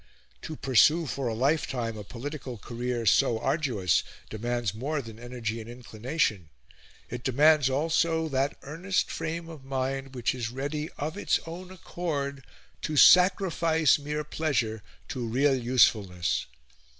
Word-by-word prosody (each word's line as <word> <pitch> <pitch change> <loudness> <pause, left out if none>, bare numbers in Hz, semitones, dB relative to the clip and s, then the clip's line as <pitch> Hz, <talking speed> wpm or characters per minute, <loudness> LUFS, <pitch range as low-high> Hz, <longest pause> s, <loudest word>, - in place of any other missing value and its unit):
To 155 - -6
pursue 150 +6 +4
for 135 -2 -3
a 115 - -2
lifetime 125 -3 0
a 105 - -7
political 130 +3 -7
career 120 +2 -4
so 110 +3 +4
arduous 110 - +1 0.3
demands 120 -1 -2
more 140 +7 -2
than 115 -4 -9
energy 120 -2 -4
and 110 - -10
inclination 120 - -2 0.6
it 120 0 -5
demands 145 +1 +4
also 160 +3 +1
that 135 0 0
earnest 175 +7 -1
frame 165 +1 -4
of 160 -5 -10
mind 135 0 -3
which 125 -1 0
is 120 -3 -3
ready 145 +5 -4
of 155 +7 -4
its - - +2
own 175 +3 -8
accord 145 -7 -4 0.4
to 155 - -3
sacrifice 170 -4 +5
mere 150 +1 -3
pleasure 130 -8 -1 0.3
to 120 -2 -3
real 135 +5 +3
usefulness. 115 -8 +2
135 Hz, 135 wpm, -28 LUFS, 120-155 Hz, 0.6 s, sacrifice